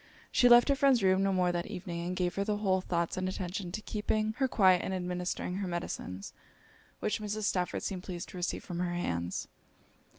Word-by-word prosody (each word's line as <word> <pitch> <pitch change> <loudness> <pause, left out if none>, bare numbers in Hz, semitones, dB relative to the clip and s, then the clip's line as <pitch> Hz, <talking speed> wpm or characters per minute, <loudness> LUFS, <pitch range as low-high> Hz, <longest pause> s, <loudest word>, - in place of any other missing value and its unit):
She 245 - +5
left 240 0 +8
her 280 - +5
friend's 270 -5 +4
room 190 0 +4
no 195 0 +2
more 180 -1 +2
that 175 0 -2
evening; 175 -4 -5
and 180 - -2
gave 180 -1 0
her 200 - 0
whole 200 -3 +1
thoughts 170 -2 -1
and 185 0 -1
attention 185 -1 -4
to 215 +3 -5
keeping 215 0 -1
her 265 - +3
quiet 190 -7 +5
and 190 - -2
administering 180 0 -3
her 195 -1 -2
medicines, 100 - -5 0.7
which 215 - -1
Mrs. 210 +1 -3
Stafford 180 -3 0
seemed 185 -2 -3
pleased 180 -1 -6
to - - -9
receive 175 0 -2
from 175 -1 -5
her 175 -1 -1
hands. 85 - -2
185 Hz, 200 wpm, -31 LUFS, 175-205 Hz, 0.7 s, left